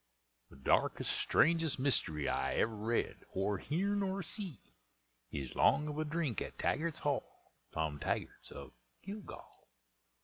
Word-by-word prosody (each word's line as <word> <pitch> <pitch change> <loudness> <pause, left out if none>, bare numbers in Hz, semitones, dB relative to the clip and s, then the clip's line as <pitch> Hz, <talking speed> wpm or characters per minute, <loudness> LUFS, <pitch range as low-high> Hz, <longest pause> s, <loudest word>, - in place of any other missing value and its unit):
The - - -15
darkest, 65 - +2
strangest 165 -2 +3
mystery 80 - +3
I - - 0
ever 110 0 +1
read, 110 +3 -1
or 100 0 0
heern, 200 - 0
or 195 0 -1
see, 185 -2 -3 0.7
Is 70 -3 -4
'long 150 - +4
of 150 0 -4
a 155 - 0
drink 150 - -1
at - - -5
Taggart's 165 0 0
Hall, 145 -2 -3 0.2
Tom 80 -2 -2
Taggart's - - -3
of - - -9 0.3
Gilgal. 200 +1 -9
150 Hz, 135 wpm, -35 LUFS, 105-170 Hz, 0.7 s, long